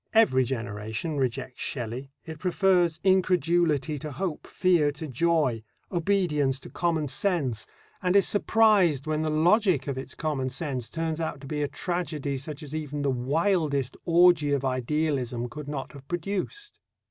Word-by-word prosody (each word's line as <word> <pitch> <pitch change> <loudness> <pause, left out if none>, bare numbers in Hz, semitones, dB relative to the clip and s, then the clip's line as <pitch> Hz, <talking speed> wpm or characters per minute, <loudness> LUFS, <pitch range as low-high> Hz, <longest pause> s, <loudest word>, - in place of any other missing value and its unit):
Every 170 -13 +5
generation 115 - -4
rejects 125 -1 -2
Shelley; 125 +1 -4 0.2
it 160 -2 -8
prefers 180 -2 +2
incredulity 170 -5 +2
to 150 +2 -6
hope, 175 +1 -4
fear 175 -5 +2
to 155 +2 -7
joy, 145 -4 +1 0.3
obedience 170 -7 +1
to - - -11
common 165 -4 0
sense, 140 - 0 0.3
and 180 0 +1
is 200 - +5
surprised 205 - +3
when 155 0 -1
the 155 - 0
logic 170 - +3
of 135 -2 -3
its 130 - -7
common 145 -4 -2
sense 130 -3 -4
turns 165 0 -2
out 160 -3 -3
to - - -10
be 150 +1 -3
a 145 - +1
tragedy 155 -5 -3
such 145 +3 -6
as 150 0 -8
even 150 -2 -3
the 140 - +2
wildest 140 +1 0
orgy 170 -3 +5
of 140 -1 0
idealism 130 -2 -1
could 150 +3 -8
not 145 -2 -5
have 140 -1 -13
produced. 200 - -4
155 Hz, 155 wpm, -27 LUFS, 135-175 Hz, 0.3 s, Every